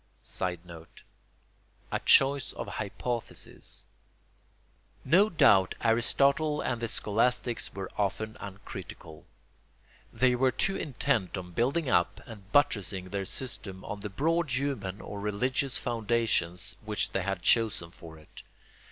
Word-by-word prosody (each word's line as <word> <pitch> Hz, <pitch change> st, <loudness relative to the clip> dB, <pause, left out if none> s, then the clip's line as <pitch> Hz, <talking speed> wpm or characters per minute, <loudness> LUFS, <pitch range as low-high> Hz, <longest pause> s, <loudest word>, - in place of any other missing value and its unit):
[Sidenote: 85 Hz, -2 st, -5 dB, 0.9 s
A -, -, 0 dB
choice 135 Hz, 0 st, +4 dB
of -, -, -5 dB
hypotheses.] 110 Hz, +3 st, -5 dB, 1.2 s
No 195 Hz, +6 st, +5 dB
doubt 95 Hz, -, +5 dB
Aristotle 140 Hz, +6 st, +2 dB
and 120 Hz, -2 st, -2 dB
the 115 Hz, -, 0 dB
scholastics 120 Hz, +2 st, +1 dB
were 95 Hz, -1 st, -5 dB
often 110 Hz, +2 st, -1 dB
uncritical. 95 Hz, -6 st, -9 dB, 0.8 s
They 130 Hz, -1 st, +3 dB
were 130 Hz, +1 st, +3 dB
too 195 Hz, +9 st, +1 dB
intent 130 Hz, -, -1 dB
on 90 Hz, -1 st, -7 dB
building 135 Hz, -, 0 dB
up 90 Hz, -8 st, +2 dB
and 105 Hz, -4 st, -12 dB
buttressing 100 Hz, -10 st, +1 dB
their 100 Hz, 0 st, -2 dB
system 95 Hz, -4 st, -3 dB
on 105 Hz, -, -5 dB
the 105 Hz, +1 st, -5 dB
broad 165 Hz, -, 0 dB
human 125 Hz, -7 st, -2 dB
or 100 Hz, -, -7 dB
religious 125 Hz, +6 st, 0 dB
foundations 115 Hz, -6 st, 0 dB
which 105 Hz, -3 st, -1 dB
they 95 Hz, -, 0 dB
had 95 Hz, -1 st, -3 dB
chosen 110 Hz, -7 st, +2 dB
for 80 Hz, -2 st, -12 dB
it. 75 Hz, -, -14 dB
110 Hz, 120 wpm, -29 LUFS, 95-130 Hz, 1.2 s, No